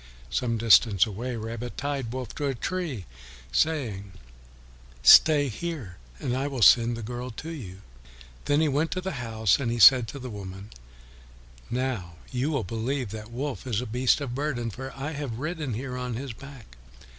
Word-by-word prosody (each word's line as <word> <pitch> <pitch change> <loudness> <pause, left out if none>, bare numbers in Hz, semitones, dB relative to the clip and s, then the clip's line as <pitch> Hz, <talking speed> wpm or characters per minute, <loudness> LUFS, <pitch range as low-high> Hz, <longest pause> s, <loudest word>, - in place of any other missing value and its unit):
Some 115 -2 0
distance 110 -3 +5
away, 120 +4 -4
Rabbit 115 +2 -6
tied 140 -4 -3
Wolf 130 -2 -5
to 145 - -2
a 135 - -1
tree, 155 - -3 0.5
saying, 105 - -1 0.9
"Stay 145 - +8
here 130 - -5 0.2
and 125 - -2
I 135 +2 -1
will 135 -5 -1
send 120 +1 +6
the 115 - -6
girl 120 +3 -5
to 150 +8 -7
you." 100 - -9 0.6
Then 145 +2 +3
he 160 - +3
went 150 +3 +1
to 185 - -3
the 190 +1 -3
house, 110 -4 +1
and 125 -4 -1
he 120 - -1
said 125 0 +8
to 140 - -7
the 130 -2 -7
woman, 100 0 -8 1.0
"Now 120 -9 -3 0.2
you 130 +3 -1
will 140 -7 -1
believe 115 +4 -3
that 110 0 -7
Wolf 130 -1 -5
is 110 -4 0
a 125 - -3
beast 125 +5 +2
of 130 -4 -4
burden, 130 -4 -2
for 130 +4 -7
I 140 +3 -4
have 140 -7 -5
ridden 150 -3 -3
here 125 +2 -5
on 125 -2 -4
his 130 0 -5
back." 125 - -13
125 Hz, 180 wpm, -26 LUFS, 110-140 Hz, 1.0 s, Stay